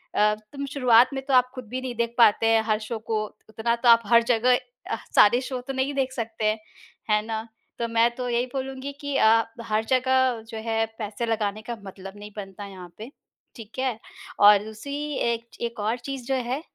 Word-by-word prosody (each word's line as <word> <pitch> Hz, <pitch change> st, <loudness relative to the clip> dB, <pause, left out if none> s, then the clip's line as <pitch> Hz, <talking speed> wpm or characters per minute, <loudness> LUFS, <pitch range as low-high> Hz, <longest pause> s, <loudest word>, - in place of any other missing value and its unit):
अ, 210 Hz, 0 st, +4 dB, 0.2 s
तुम 280 Hz, 0 st, -4 dB
शुरुआत 250 Hz, -1 st, +5 dB
में 270 Hz, 0 st, -4 dB
तो 275 Hz, -, -1 dB
आप 250 Hz, 0 st, +4 dB
ख़ुद 255 Hz, -3 st, -8 dB
भी 255 Hz, +2 st, -4 dB
नहीं 255 Hz, -2 st, -5 dB
देख 235 Hz, 0 st, -2 dB
पाते 225 Hz, -1 st, +5 dB
हैं 225 Hz, 0 st, +4 dB
हर 215 Hz, -1 st, +1 dB
शो 230 Hz, -, -3 dB
को। 215 Hz, -1 st, +1 dB, 0.3 s
उतना 225 Hz, +2 st, 0 dB
तो 235 Hz, +1 st, +2 dB
आप 230 Hz, 0 st, +8 dB
हर 235 Hz, +1 st, +6 dB
जगह 245 Hz, +2 st, +4 dB, 0.3 s
अ, -, -, -1 dB, 0.2 s
सारे 240 Hz, +4 st, +6 dB
शो 255 Hz, -1 st, -4 dB
तो 270 Hz, -, -3 dB
नहीं 265 Hz, +2 st, -1 dB
देख 265 Hz, -2 st, 0 dB
सकते 220 Hz, -3 st, -1 dB, 0.5 s
हैं 210 Hz, 0 st, +3 dB
ना? 220 Hz, 0 st, -4 dB, 0.3 s
तो 235 Hz, -, 0 dB
मैं 230 Hz, 0 st, +3 dB
तो 250 Hz, 0 st, -4 dB
यही 240 Hz, +1 st, +1 dB
बोलूँगी 270 Hz, 0 st, -4 dB
कि 285 Hz, -1 st, -3 dB
अ, 225 Hz, 0 st, +5 dB, 0.2 s
हर 215 Hz, -1 st, 0 dB
जगह 260 Hz, -1 st, +2 dB
जो 225 Hz, -, -6 dB
है 225 Hz, 0 st, 0 dB
पैसे 215 Hz, +2 st, -3 dB
लगाने 215 Hz, -2 st, -1 dB
का 240 Hz, -, -3 dB
मतलब 195 Hz, +1 st, -10 dB
नहीं 210 Hz, 0 st, -10 dB
बनता 200 Hz, 0 st, -7 dB
यहाँ 185 Hz, -3 st, -11 dB
पे। 225 Hz, +5 st, -9 dB, 0.4 s
ठीक 225 Hz, +1 st, -10 dB
है? 255 Hz, -4 st, -1 dB, 0.4 s
और 205 Hz, 0 st, +7 dB
दूसरी 220 Hz, +6 st, -7 dB, 0.3 s
एक 235 Hz, 0 st, -5 dB
एक 235 Hz, -1 st, -4 dB
और 215 Hz, +3 st, 0 dB
चीज़ 260 Hz, 0 st, -6 dB
जो 270 Hz, -, +1 dB
है, 265 Hz, +4 st, -1 dB
230 Hz, 210 wpm, -25 LUFS, 215-255 Hz, 0.5 s, आप